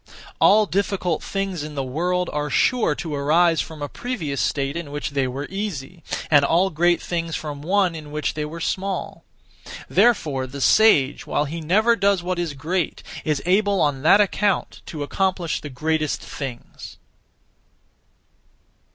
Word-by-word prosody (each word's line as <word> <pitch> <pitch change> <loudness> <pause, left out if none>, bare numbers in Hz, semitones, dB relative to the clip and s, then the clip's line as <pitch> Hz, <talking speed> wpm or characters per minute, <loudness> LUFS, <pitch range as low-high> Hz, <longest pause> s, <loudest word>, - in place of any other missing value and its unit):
All 215 +1 +6
difficult 190 -4 -1
things 195 -4 -3
in 150 0 -7
the 135 - -1
world 175 +7 -1
are 150 0 -2
sure 220 - +2
to 160 -1 -5
arise 160 +4 +3
from 155 -2 -7
a - - -2
previous 160 - -4
state 140 0 -1
in 170 -3 -5
which 145 0 -4
they 135 -2 0
were 135 +3 -4
easy, 180 -5 -5 0.3
and 145 -2 +6
all 175 +6 +2
great 175 +2 +2
things 165 -2 -3
from 145 -2 -5
one 185 +2 +2
in 155 -2 -8
which 150 0 -2
they 150 - -3
were 155 +3 -6
small. 190 +3 -3 0.6
Therefore 150 - +2
the 140 +2 -8
sage, 145 -4 +4
while 150 - 0
he 165 +3 -5
never 215 +9 +3
does 200 -3 +2
what 180 0 -2
is 165 -4 -3
great, 165 +5 -2 0.2
is 150 -2 -1
able 200 +2 +2
on 145 -4 +1
that 165 +7 +6
account 205 -1 0
to 150 -3 -5
accomplish 180 +1 -1
the 145 - -7
greatest 155 +3 -1
things. 130 -4 -8
165 Hz, 160 wpm, -22 LUFS, 145-190 Hz, 0.6 s, All